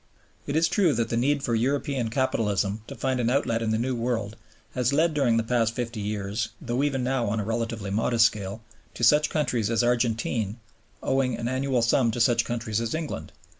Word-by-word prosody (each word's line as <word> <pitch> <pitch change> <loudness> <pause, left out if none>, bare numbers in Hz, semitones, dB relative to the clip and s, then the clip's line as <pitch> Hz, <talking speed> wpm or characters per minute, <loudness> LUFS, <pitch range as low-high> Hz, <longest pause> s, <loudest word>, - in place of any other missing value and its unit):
It 140 - -2
is 165 +1 +4
true 180 -6 +2
that 115 0 0
the - - -1
need 140 +4 +1
for 120 - 0
European 130 +1 0
capitalism 110 -4 0
to 140 - -8
find 130 +1 -1
an 120 -1 +1
outlet 120 -3 +1
in 115 - -1
the 110 - +1
New 125 +3 -1
World 115 -3 -2 0.4
has 125 0 +1
led 160 +3 +2
during 130 -6 +2
the 115 - +1
past 115 -1 +1
fifty 120 -2 -3
years, 105 0 -2
though 125 -3 -2
even 135 -3 0
now 125 -2 0
on 110 +2 -1
a - - -1
relatively 115 -2 -3
modest 115 +2 +3
scale, 105 0 -2 0.3
to - - -5
such 150 +5 +5
countries 125 -8 0
as 115 0 +2
Argentine 115 -3 0 0.5
owing 130 -3 +1
an 115 0 -3
annual 130 -1 0
sum 120 +1 +3
to 120 - -3
such 115 0 +3
countries 115 -2 -2
as 115 +3 -2
England. 160 -2 -5
120 Hz, 205 wpm, -26 LUFS, 115-130 Hz, 0.5 s, such